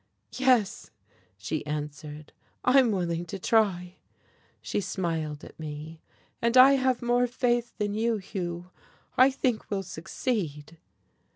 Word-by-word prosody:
"Yes," 255 -6 +2 0.5
she 100 +11 -3
answered, 150 0 -6 0.3
"I'm 255 -1 +5
willing 175 -4 -1
to 195 - -5
try." 185 -4 +1 0.6
She - - -2
smiled 165 -6 -3
at - - -13
me. 155 +1 -7 0.4
"And 235 +2 +2
I 260 +2 +9
have 260 -3 +1
more 245 +1 +2
faith 240 -1 0
than 205 -1 -1
you, 225 +1 +1
Hugh. 180 -2 -5 0.4
I 255 +2 +7
think 255 -4 -1
we'll 195 -2 -1
succeed.".... 165 - -4
195 Hz, 120 wpm, -27 LUFS, 160-240 Hz, 0.6 s, I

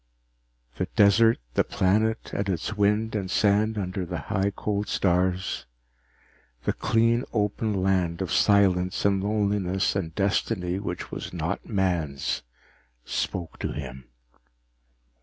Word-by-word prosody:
The - - -1
desert, 110 +3 +5 0.2
the - - +3
planet 105 +3 +1
and 100 0 -1
its 95 +4 -2
wind 105 +2 +1
and 100 -3 -2
sand 105 +2 +2
under 95 -1 -2
the 90 0 -4
high 100 0 -1
cold 105 -1 -2
stars, 90 0 0 1.0
the - - 0
clean 115 +2 +2
open 105 0 0
land 90 -3 +1
of 95 -4 -3
silence 95 -3 +3
and 100 -1 +2
loneliness 100 -3 0
and 95 -4 -1
a 80 - -15
destiny 95 -2 0
which 90 -3 -5
was - - -6
not - - -3
man's, 85 -8 -1 0.6
spoke 85 -4 -3
to - - -3
him. 65 0 -7
100 Hz, 125 wpm, -26 LUFS, 90-105 Hz, 1.0 s, desert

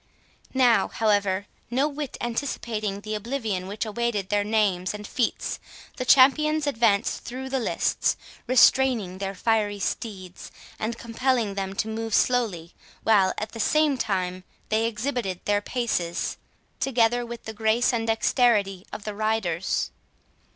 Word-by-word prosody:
Now, 240 -6 +4
however, 205 -3 +1 0.2
no 265 +5 +2
whit 295 -2 -5
anticipating 230 -5 -3
the 215 +1 -5
oblivion 215 -4 -3
which 205 +3 -3
awaited 215 -3 -2
their 205 0 +2
names 205 -3 +1
and 210 0 -8
feats, 240 +2 -1 0.4
the 255 - -3
champions 305 +4 +5
advanced 225 -7 +1
through 260 +2 -6
the 265 0 0
lists, 235 - 0 0.3
restraining 245 -7 +4
their 195 0 -3
fiery 210 0 +1
steeds, 190 -4 -5 0.3
and 230 +2 -2
compelling 235 -2 0
them 195 -1 -4
to 210 - -1
move 225 0 -2
slowly, 205 -10 +1 0.3
while, 200 -4 +4
at 215 0 -4
the 230 - -9
same 305 +5 +3
time, 185 -5 -2 0.3
they 220 +1 +2
exhibited 225 -4 -2
their 205 0 +2
paces, 205 -8 -2 0.4
together 245 -2 +2
with 235 0 -8
the 220 - -6
grace 220 +3 +2
and 225 -1 -1
dexterity 220 -4 +2
of 210 - -7
the 210 - -4
riders. 205 -5 -1
220 Hz, 135 wpm, -25 LUFS, 200-245 Hz, 0.4 s, champions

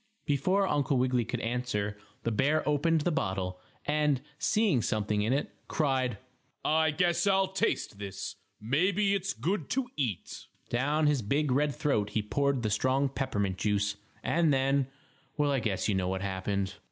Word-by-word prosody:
Before 185 +7 +2
Uncle 140 -3 +1
Wiggily 125 -1 +2
could 120 +1 -3
answer, 115 -4 -1 0.3
the 115 - 0
bear 145 +8 +2
opened 155 +2 +2
the 175 - +1
bottle, 95 - -2 0.3
and, 150 -2 +2 0.2
seeing 165 - +2
something 105 -1 0
in 110 +3 +1
it, 140 +2 -1
cried: 130 -7 0 0.5
"I 160 0 +3
guess 175 +5 +1
I'll 195 -1 +3
taste 190 - -1
this. 100 -1 -6 0.2
Maybe 185 - +2
it's 195 -1 -1
good 160 - -2
to 260 -1 -1
eat." 120 - -3 0.2
Down 145 +6 +1
his 145 -3 +3
big, 140 +7 0
red 145 +1 +2
throat 105 -8 +1
he 105 0 -1
poured 140 +3 0
the 110 - 0
strong 130 +6 +2
peppermint 100 -9 -2
juice, 105 +1 +1 0.3
and 165 -2 +3
then 135 0 +2 0.5
well, 145 -1 +2
I 135 - +2
guess 100 -5 -1
you 105 - +2
know 95 -1 0
what 95 +1 -2
happened. 100 0 -2
135 Hz, 165 wpm, -30 LUFS, 105-150 Hz, 0.5 s, I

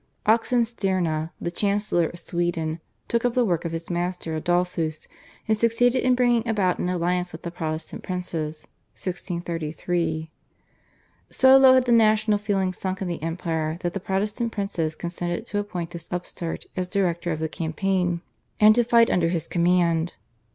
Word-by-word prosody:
Oxenstierna, 195 -8 +1
the 170 - -3
chancellor 200 -3 +1
of 175 - -10
Sweden, 170 -2 -2 0.3
took 235 0 0
up 245 -1 +1
the 250 -1 +3
work 175 -4 0
of 165 - -2
his 165 +1 -5
master 175 -1 -2
Adolphus 165 -1 -1 0.4
and 220 - +3
succeeded 235 +3 +2
in 255 -1 +4
bringing 240 -2 +2
about 200 -5 +1
an 180 - -1
alliance 180 0 0
with 160 - -10
the 170 - -4
Protestant 160 -2 -4
princes 165 -4 -4 0.3
(1633). 170 -2 -3 1.0
So 265 0 +6
low 265 -1 +8
had 255 -1 +4
the 245 - +1
national 215 -2 +4
feeling 195 -3 0
sunk 190 +1 -3
in - - -3
the 170 -3 -4
empire 165 -1 -2
that 175 -1 -2
the 195 - -2
Protestant 210 +5 -1
princes 175 -7 -2
consented 175 +4 -4
to 205 - -2
appoint 180 -5 -4
this 170 -1 -8
upstart 175 -1 -4
as 185 -1 -2
director 175 -3 0
of 160 - -1
the 160 +1 -1
campaign 175 +2 -1 0.4
and 215 0 +8
to 240 +2 +3
fight 235 0 +4
under 165 -2 +2
his 170 -3 -2
command. 170 -1 +2
180 Hz, 160 wpm, -24 LUFS, 170-210 Hz, 1.0 s, low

